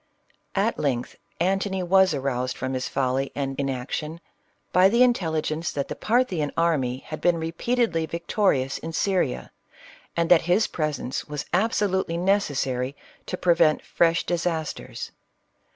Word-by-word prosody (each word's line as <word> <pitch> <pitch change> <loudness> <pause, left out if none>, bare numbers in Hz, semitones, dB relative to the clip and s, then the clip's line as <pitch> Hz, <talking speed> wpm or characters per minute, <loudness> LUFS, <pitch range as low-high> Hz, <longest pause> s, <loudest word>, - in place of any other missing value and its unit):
" - - -43
At 230 - -3
length 125 -4 -1 0.2
Antony 190 +1 0
was 190 -1 +4
aroused 130 -2 -2
from 130 +1 -3
his 130 0 -2
folly 135 0 0
and 135 -1 -2
inaction, 140 +4 -3 0.5
by 185 +1 +6
the 235 +4 +5
intelligence 165 -8 0
that 140 -1 -3
the - - -4
Parthian 210 - +1
army 135 -7 +1
had 155 - -7
been 175 -1 +3
repeatedly 165 +2 0
victorious 170 -6 0
in 165 0 -6
Syria, 180 - 0 0.7
and 170 0 +2
that 175 - +8
his 180 +6 +2
presence 150 -5 -3
was 150 -1 -5
absolutely 190 -3 +1
necessary 145 -9 0 0.3
to 180 - -3
prevent 170 -4 +3
fresh 170 -1 +2
dis 175 0 0
asters. 160 -3 -4
165 Hz, 135 wpm, -25 LUFS, 140-185 Hz, 0.7 s, that